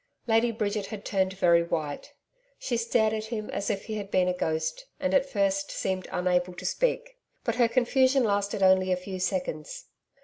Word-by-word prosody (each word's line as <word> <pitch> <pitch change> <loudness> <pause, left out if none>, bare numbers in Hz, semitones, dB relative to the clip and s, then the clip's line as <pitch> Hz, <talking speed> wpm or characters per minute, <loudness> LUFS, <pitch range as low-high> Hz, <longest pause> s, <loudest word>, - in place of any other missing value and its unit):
Lady 230 +1 +3
Bridget 210 -2 -2
had 210 -2 -8
turned 190 -2 0
very 170 -3 +4
white. 155 -4 -4 0.4
She 245 - -2
stared 230 -1 +2
at 215 0 -3
him 220 -2 -5
as 200 - -2
if 200 -2 -2
he 215 -1 -4
had 200 -2 -6
been 185 -2 +2
a 180 - +1
ghost, 160 - -2
and 280 -1 -1
at 275 0 +3
first 195 -2 0
seemed 190 -1 -2
unable 180 0 0
to - - -8
speak. - - -1 0.2
But 230 0 -1
her 240 -2 +5
confusion 260 +2 +3
lasted 200 -2 0
only 185 0 +4
a 180 - +2
few 185 +1 -6
seconds. 180 -5 -3
200 Hz, 190 wpm, -27 LUFS, 185-230 Hz, 0.4 s, her